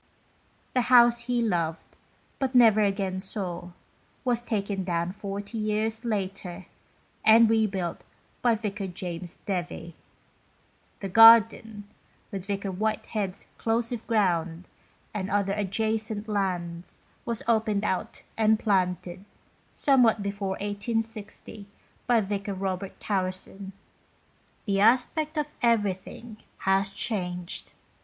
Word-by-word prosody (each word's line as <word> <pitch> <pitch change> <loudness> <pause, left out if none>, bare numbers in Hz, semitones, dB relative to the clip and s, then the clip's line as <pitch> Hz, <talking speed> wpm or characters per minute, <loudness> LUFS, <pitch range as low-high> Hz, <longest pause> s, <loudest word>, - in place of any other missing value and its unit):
The 255 - +3
house 240 -1 +6
he 245 -1 +1
loved, 165 -6 -2 0.4
but 265 -1 -1
never 225 -3 +6
again 195 -2 0
saw, 185 -3 -4 0.6
was 240 -2 +1
taken 200 -4 -2
down 170 -1 -1
40 200 +3 -6
years 215 +2 -1
later, 195 -4 -3 0.6
and 225 +1 +7
re 220 0 +3
built 185 -4 -4 0.4
by 240 -2 +3
Vicar 205 -2 -4
James 175 -1 -6
Devie. 175 -3 -4 1.1
The 195 - -4
gardeil, 225 0 +7 0.5
with 195 -1 -6
Vicar 200 -1 -2
Whitehead's 210 -1 -2
" - - -34
close 230 +1 0
of 235 -2 -5
ground 180 -5 0 0.2
" - - -36
and 200 -2 -3
other 200 0 +1
adjacent 215 +1 -2
lands, 180 -4 -3 0.2
was 230 -1 -3
opened 220 -3 +2
out 185 - -2
and 220 0 +3
planted, 185 -3 -1 0.5
somewhat 245 -7 +3
before 200 -1 -3
1860, 210 0 -4 0.4
by 240 -2 +4
Vicar 200 0 -3
Robert 190 0 -4
Towerson. 190 0 -3 0.9
The 200 -2 +1
aspect 260 +8 +2
of 300 -1 -1
everything 215 0 -1 0.3
Ihas 195 +1 +2
changed. 180 -5 -3
205 Hz, 115 wpm, -27 LUFS, 190-225 Hz, 1.1 s, and